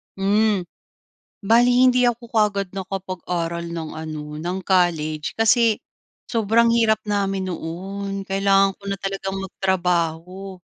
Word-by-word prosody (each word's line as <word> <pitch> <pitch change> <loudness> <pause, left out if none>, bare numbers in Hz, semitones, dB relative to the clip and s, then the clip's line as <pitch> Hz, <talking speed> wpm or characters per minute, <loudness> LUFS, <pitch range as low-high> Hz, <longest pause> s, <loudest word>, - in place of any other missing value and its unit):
Hmm. 205 0 +2 0.9
Bale 240 +2 +6
hindi 250 -1 +5
ako 240 0 0
ka'gad 205 -3 +2
nakapag-aral 180 -3 -4
ng, 165 -2 -5
ano, 155 -1 -5 0.2
ng 175 +3 -2
college 160 -5 +1
kasi 225 0 +4 0.5
sobrang 230 +1 +3
hirap 220 -2 +3
namin 195 -2 -1
noon. 195 +4 -5
Kailangan 195 0 +3
ko 200 - -25
na 195 - -2
talagang 195 0 -4
magtrabaho, 180 0 -2
195 Hz, 110 wpm, -22 LUFS, 180-210 Hz, 0.9 s, Bale